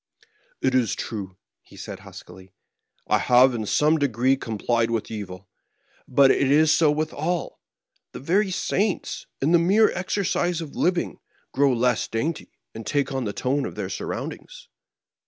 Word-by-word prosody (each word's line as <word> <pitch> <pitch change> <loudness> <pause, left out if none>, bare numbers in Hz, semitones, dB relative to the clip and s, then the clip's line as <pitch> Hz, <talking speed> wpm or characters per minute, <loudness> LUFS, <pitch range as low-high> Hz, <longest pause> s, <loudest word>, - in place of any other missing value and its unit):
"It 130 - +1
is 125 -4 +2
true," 95 -5 -6 0.2
he - - -18
said, - - -8
huskily; 95 +1 -13 0.6
"I - - +2
have 125 +1 +5
in 110 -3 -3
some 155 +6 +3
degree 130 -1 +2
complied 115 -1 -1
with 115 -2 -2
evil. 100 -3 -7 0.6
But 135 +1 +5
it 135 - +2
is 155 +2 +5
so 155 -1 +4
with 155 +1 -1
all: 170 +2 -3 0.5
the - - -8
very 190 +8 +1
saints, 195 +1 -2 0.2
in 150 - +2
the 170 - +6
mere 200 +6 +4
exercise 180 -2 -1
of 160 -4 -7
living, 180 0 0 0.3
grow 140 0 +3
less 125 -1 +1
dainty, 145 +9 -3 0.2
and 115 - -7
take 140 +5 -1
on 130 -2 -2
the 105 - -2
tone 135 +2 -1
of - - -5
their 100 -3 -4
surroundings." - - -6
135 Hz, 155 wpm, -24 LUFS, 115-160 Hz, 0.6 s, the